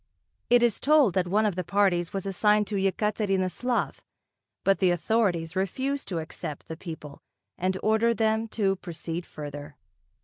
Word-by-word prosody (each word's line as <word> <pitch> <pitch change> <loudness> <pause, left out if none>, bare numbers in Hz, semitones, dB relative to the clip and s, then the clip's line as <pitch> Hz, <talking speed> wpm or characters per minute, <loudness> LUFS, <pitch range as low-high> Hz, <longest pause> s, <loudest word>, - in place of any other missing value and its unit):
It 245 0 +5
is 235 -4 +2
told 290 - +4
that 185 -2 +1
one 210 +4 +2
of 210 - +1
the 185 - -2
parties 180 -2 +1
was 195 -1 -4
assigned 210 +2 +3
to 210 - -2
Yekaterinoslav, 200 +3 0 0.7
but 195 0 +3
the 185 - +4
authorities 175 -3 +1
refused 260 +9 -1
to 180 - -3
accept 155 -2 -6
the 160 - -5
people 160 -4 -9 0.3
and 185 +1 -1
ordered 220 +1 +3
them 220 +1 +1
to 195 -3 0
proceed 170 0 -6
further. 145 0 -8
195 Hz, 150 wpm, -27 LUFS, 175-220 Hz, 0.7 s, It